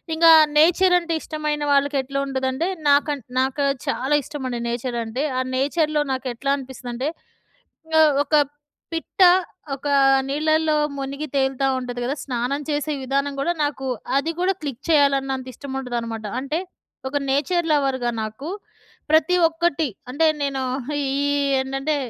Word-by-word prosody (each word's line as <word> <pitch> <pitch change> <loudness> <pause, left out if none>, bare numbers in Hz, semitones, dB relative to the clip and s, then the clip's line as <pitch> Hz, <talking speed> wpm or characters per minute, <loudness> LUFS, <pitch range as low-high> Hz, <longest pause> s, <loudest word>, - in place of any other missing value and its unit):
ఇంకా 330 +1 +6 0.3
నేచర్ 355 +4 +5
అంటే 335 -1 -4
ఇష్టమైన 300 -1 -3
వాళ్ళకెట్లా 275 -1 +1
ఉంటదంటే 265 +4 -1 0.2
నాకన్ 285 0 +3 0.2
నాకు 265 +2 0 0.2
చాలా 265 +3 0
ఇష్టమండి 255 -4 -5
నేచర్ 240 +1 -3
అంటే. 245 +6 -3 0.2
ఆ - - +2
నేచర్‍లో 300 +2 +1
నాకు 260 0 -4
ఎట్లా 275 +4 -2
అనిపిస్తదంటే. 260 0 -5 0.9
ఆహ్, 310 -2 +6
ఒక 305 - +1 0.6
పిట్ట 330 +4 -4 0.5
ఒక 280 +2 -7 0.4
నీళ్ళల్లో 310 +2 +1 0.2
మునిగి 275 +2 -4
తేలుతా 270 0 +1
ఉంటది 245 -1 -5
కద. 255 +3 -1
స్నానం 255 +2 -2
చేసే 295 +1 -1
విధానం 275 +2 -1
కూడా 340 +5 +1
నాకు 275 -2 -2 0.3
అది 320 +4 0
కూడా 370 +2 +2
క్లిక్ 280 -3 -6
చేయాలన్నంత 270 -3 +2
ఇష్టం 270 +2 -8
ఉంటదనమాట. 230 -3 -4
అంటే 290 +5 -2 0.5
ఒక 280 +2 -1
నేచర్ 325 +5 +1
లవర్‌గా 265 -4 +1
నాకు 215 +7 -6 0.6
ప్రతి 315 +3 +4
ఒక్కటి 325 -1 0 0.2
అంటే 295 +5 +1 0.2
నేను 275 -1 -1 0.4
ఈ 270 - -1 0.5
ఏంటంటే 270 +3 -1
275 Hz, 130 wpm, -22 LUFS, 265-305 Hz, 0.9 s, ఇంకా